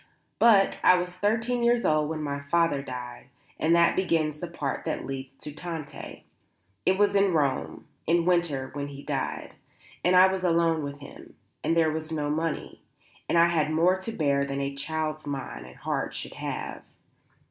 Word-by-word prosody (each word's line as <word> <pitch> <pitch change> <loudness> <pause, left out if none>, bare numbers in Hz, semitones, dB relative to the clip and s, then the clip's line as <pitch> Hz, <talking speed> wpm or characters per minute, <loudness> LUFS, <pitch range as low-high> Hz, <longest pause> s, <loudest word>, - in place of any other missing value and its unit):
But 210 -4 +5
I 180 - +7
was 180 0 -3
thirteen 225 +5 0
years 235 0 +3
old 155 -1 +2
when 155 -1 -3
my 140 -1 -2
father 145 0 +1
died, 125 -2 -7 0.3
and 165 +2 +3
that 170 0 +4
begins 160 -5 0
the 175 - -4
part 150 -5 -4
that - - -3
leads 135 0 -7
to 150 - -5
Tante. 160 -1 -7 0.6
It 190 - +4
was 205 0 +3
in 200 -2 +3
Rome, 145 -4 -1 0.2
in 170 +1 +3
winter 170 -7 +1
when 145 0 -4
he 140 0 -9
died; - - -3 0.5
and 180 +1 +4
I 185 +1 +9
was 190 0 0
alone 165 -2 +2
with 140 0 -6
him; 140 - -12 0.3
and 165 - +1
there 160 -1 +4
was 155 +1 -3
no 150 -2 -1
money, 160 +1 -3 0.5
and - - +3
I 170 0 +6
had 155 -3 +1
more 170 +4 +4
to 190 +4 -5
bear 140 -8 +1
than 140 0 -3
a 140 0 -2
child's 155 +2 -3
mind 135 - -5
and 65 - -13
heart - - -3
should - - -6
have. - - -5
160 Hz, 180 wpm, -27 LUFS, 140-180 Hz, 0.6 s, I